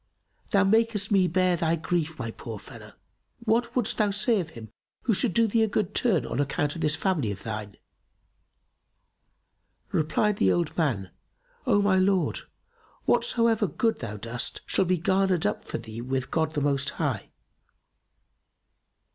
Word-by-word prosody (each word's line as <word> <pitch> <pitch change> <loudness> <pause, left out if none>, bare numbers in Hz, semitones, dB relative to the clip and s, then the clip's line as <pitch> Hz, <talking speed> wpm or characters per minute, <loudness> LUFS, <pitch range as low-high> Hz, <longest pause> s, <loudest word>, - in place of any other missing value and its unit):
Thou 200 -1 +4
makest 215 0 +2
me 190 -2 +4
bear 185 +1 +2
thy 165 -1 +1
grief 160 -1 -2
my 115 -3 -4
poor 110 -1 -7
fellow! 105 0 -12 0.5
What 235 +2 +1
wouldst 240 -3 0
thou 210 -1 +3
say 210 +2 +2
of 170 -4 -4
him 110 -2 -10 0.3
who 230 - +2
should 215 +3 +1
do 230 +6 +3
thee 225 +1 +2
a 220 - +4
good 210 -1 -1
turn, 185 - +2
on 120 - -3
account 145 +1 0
of 165 - -6
this 150 0 +2
family 160 - 0
of 100 -1 -7
thine?" 105 -2 -5 2.2
Replied 200 +6 +1
the 95 - +3
old 170 -3 0
man, 115 - 0 0.6
"O 205 - +4
my 195 -2 +3
lord, 190 -1 +2 0.7
whatsoever 230 -3 +2
good 225 +5 0
thou 110 -3 -5
dost 115 +4 -2
shall 190 - +1
be 180 +1 +2
garnered 190 0 +1
up 105 - -1
for - - -4
thee 115 0 -8
with 130 +1 -3
God 160 -1 0
the 145 - 0
Most 140 0 +1
High!" 135 -11 -2
170 Hz, 160 wpm, -27 LUFS, 130-205 Hz, 2.2 s, Thou